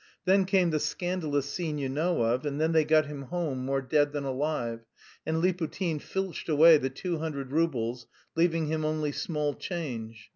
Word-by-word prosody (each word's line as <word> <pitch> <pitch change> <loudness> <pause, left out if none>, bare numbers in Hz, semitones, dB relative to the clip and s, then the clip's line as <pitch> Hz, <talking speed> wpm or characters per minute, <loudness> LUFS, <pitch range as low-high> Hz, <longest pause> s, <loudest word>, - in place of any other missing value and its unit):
Then 190 +1 +4
came 185 -3 +3
the 155 - +1
scandalous 160 -5 -1
scene 155 0 -3
you 140 -2 -2
know 155 +1 0
of, 120 +3 +1
and 145 -1 -3
then 160 +1 +2
they 160 -1 +4
got 155 0 +4
him 145 -1 -7
home 140 -3 -3
more 135 +1 -1
dead 145 +2 +2
than 145 -1 -2
alive, 130 -4 -2 0.5
and 160 +1 0
Liputin 175 -2 0
filched 190 -3 -4
away 160 +1 +8
the 135 - -1
two 170 +5 -3
hundred 140 -5 -4
roubles, 125 -7 0 0.3
leaving 165 -1 +2
him 155 +1 -1
only 155 -1 0
small 150 -5 -2
change. 115 - -6
155 Hz, 180 wpm, -28 LUFS, 140-165 Hz, 0.5 s, away